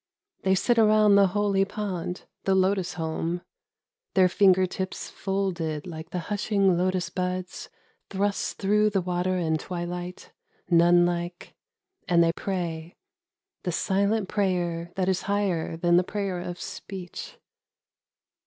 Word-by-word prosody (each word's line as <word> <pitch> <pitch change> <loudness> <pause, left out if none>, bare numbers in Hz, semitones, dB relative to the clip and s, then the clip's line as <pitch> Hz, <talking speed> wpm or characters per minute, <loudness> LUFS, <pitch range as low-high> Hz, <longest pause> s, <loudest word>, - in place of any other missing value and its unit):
They 190 0 +3
sit 235 +5 +2
around 215 -1 +5
the 200 -1 +6
holy 200 0 +1
pond, 190 -3 -4 0.2
the 195 - +3
lotus 190 -1 +1
home, 165 +1 -2 0.7
Their 185 -1 +6
finger 185 -1 +5
tips 190 +1 -5
folded 180 -6 -2
like 160 -2 -8
the 180 0 -3
hushing 200 -2 +2
lotus 180 -1 0
buds 180 0 -3 0.4
Thrust 200 +1 -1
through 210 +2 +3
the 200 -2 0
water 180 +1 0
and 160 -3 0
twilight, 175 +1 -6 0.4
nun 175 +1 +6
like, 175 0 -3 0.5
And 170 -2 +5
they 165 0 +2
pray 170 -3 -4 0.7
(^the 180 - -1
silent 200 +4 +1
prayer 175 -4 -1
that 185 -1 0
is 190 -1 +1
higher 190 -6 0
than 175 +1 +3
the 180 - +4
prayer 195 -2 -3
of 175 0 -6
speech). 185 -3 -8
185 Hz, 130 wpm, -26 LUFS, 175-195 Hz, 0.7 s, the